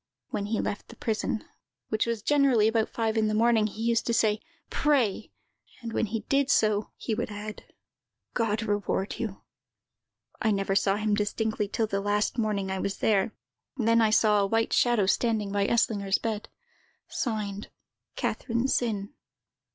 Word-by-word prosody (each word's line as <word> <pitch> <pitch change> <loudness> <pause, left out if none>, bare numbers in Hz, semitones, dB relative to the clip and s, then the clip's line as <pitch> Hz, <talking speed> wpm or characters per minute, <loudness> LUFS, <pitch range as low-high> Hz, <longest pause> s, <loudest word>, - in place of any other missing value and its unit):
When 200 - -3
he 220 0 -1
left 205 - -3
the - - -12
prison, 220 0 -2 0.4
which 220 +1 0
was 230 -3 -2
generally 275 -7 +4
about 225 0 +1
five 225 -1 -1
in 220 -1 +3
the 215 - 0
morning, 225 -1 +4
he 220 +2 -6
used 230 0 +1
to 235 - +2
say, 215 -1 +2 0.3
'Pray!' 260 - +1 0.5
and 230 -2 -6
when - - +1
he 220 +1 -3
did 275 +5 +1
so, 215 -5 +2
he 225 - -3
would 215 - -2
add, 210 +1 -7 0.7
'God 225 -2 0
reward 205 -2 -1
you!' 220 -4 -4 1.0
I 220 - +2
never 195 -2 +1
saw 195 0 +3
him 215 0 0
distinctly 210 +1 0
till 225 +2 0
the 200 -2 -2
last 205 +3 0
morning 200 -3 0
I 190 - -2
was 200 +1 -2
there; 210 0 +1 0.4
then 230 -1 +3
I 220 - +4
saw 215 -1 +4
a 200 - +2
white 225 +2 +1
shadow 240 -5 +3
standing 215 0 +1
by 200 0 +1
Eslinger's 200 -4 +2
bed. 220 -2 -4 0.6
Signed, 210 -4 -3 0.5
"CATHERINE 235 +2 -1
SINN. 210 -6 -1
215 Hz, 165 wpm, -27 LUFS, 205-230 Hz, 1.0 s, generally